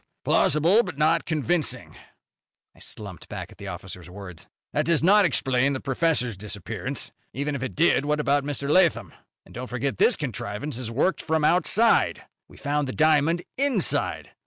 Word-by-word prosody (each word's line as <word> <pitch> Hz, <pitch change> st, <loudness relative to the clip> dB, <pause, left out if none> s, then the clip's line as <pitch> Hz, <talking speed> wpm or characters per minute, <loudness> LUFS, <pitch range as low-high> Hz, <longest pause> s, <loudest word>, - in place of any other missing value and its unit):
"Humph! -, -, -48 dB
Plausible 170 Hz, +9 st, +4 dB
but 180 Hz, -, -7 dB
not 155 Hz, +2 st, +2 dB
convincing." 160 Hz, 0 st, -1 dB, 0.8 s
I -, -, -20 dB
slumped 100 Hz, -5 st, -7 dB
back -, -, -6 dB
at -, -, -17 dB
the 100 Hz, -, -8 dB
officer's 90 Hz, -1 st, -8 dB
words. 90 Hz, -2 st, -10 dB, 0.3 s
"That -, -, +1 dB
does 165 Hz, -3 st, +2 dB
not 200 Hz, +3 st, +6 dB
explain 135 Hz, -3 st, +2 dB
the 130 Hz, -, -3 dB
professor's 135 Hz, -4 st, 0 dB
disappearance. 100 Hz, 0 st, -5 dB, 0.2 s
Even 145 Hz, +3 st, -2 dB
if 140 Hz, -, -4 dB
it 130 Hz, -, -4 dB
did, 150 Hz, -3 st, +3 dB
what 150 Hz, +1 st, 0 dB
about 145 Hz, -1 st, +2 dB
Mr. 140 Hz, -1 st, -4 dB
Lathom? 170 Hz, +2 st, +3 dB, 0.3 s
And -, -, -17 dB
don't 125 Hz, +1 st, -6 dB
forget 125 Hz, -3 st, -3 dB
this -, -, +5 dB
contrivance 125 Hz, -1 st, -4 dB
is 120 Hz, -3 st, -5 dB
worked 140 Hz, +11 st, 0 dB
from 160 Hz, -1 st, 0 dB
outside. 185 Hz, +8 st, +3 dB, 0.2 s
We -, -, -17 dB
found 145 Hz, 0 st, -1 dB
the 130 Hz, -, -4 dB
diamond 155 Hz, +2 st, +3 dB, 0.2 s
inside. 270 Hz, -, 0 dB
145 Hz, 170 wpm, -25 LUFS, 125-165 Hz, 0.8 s, not